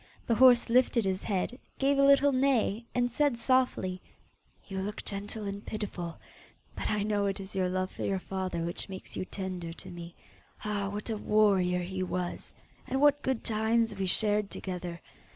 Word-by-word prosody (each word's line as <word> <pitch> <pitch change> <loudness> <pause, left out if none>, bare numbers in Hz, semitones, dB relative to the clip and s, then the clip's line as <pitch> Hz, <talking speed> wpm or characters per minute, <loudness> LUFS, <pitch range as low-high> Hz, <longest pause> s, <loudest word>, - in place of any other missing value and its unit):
The 235 - +2
horse 245 0 +7
lifted 240 -2 +3
his 190 0 0
head, 210 +5 -2 0.2
gave 275 +1 +2
a - - +6
little 280 0 +6
neigh, 255 -4 +2
and 245 0 +2
said 285 -1 +2
softly, 235 -7 +1 0.7
'You 195 -1 -4
look 205 +2 -4
gentle 205 +2 -3
and 200 +1 -5
pitiful, 190 -6 -4 0.6
but - - -2
I 210 -1 +1
know 205 -1 +1
it 195 0 -2
is 195 0 -8
your 185 -1 +1
love 185 0 -1
for - - -6
your 195 - 0
father 185 -2 -3
which 170 +3 -4
makes 190 -1 -8
you - - -3
tender 185 -3 -5
to - - -8
me. 170 -1 -9 0.5
Ah, 205 -2 -1
what 210 +3 -4
a 220 - -1
warrior 195 -4 +3
he 185 +1 -4
was, 180 -1 -3 0.4
and 265 - 0
what 290 0 +5
good 265 -3 -1
times 225 0 +1
we 195 -1 -2
shared 210 +1 +1
together! 180 -2 -5
205 Hz, 180 wpm, -30 LUFS, 185-235 Hz, 0.7 s, horse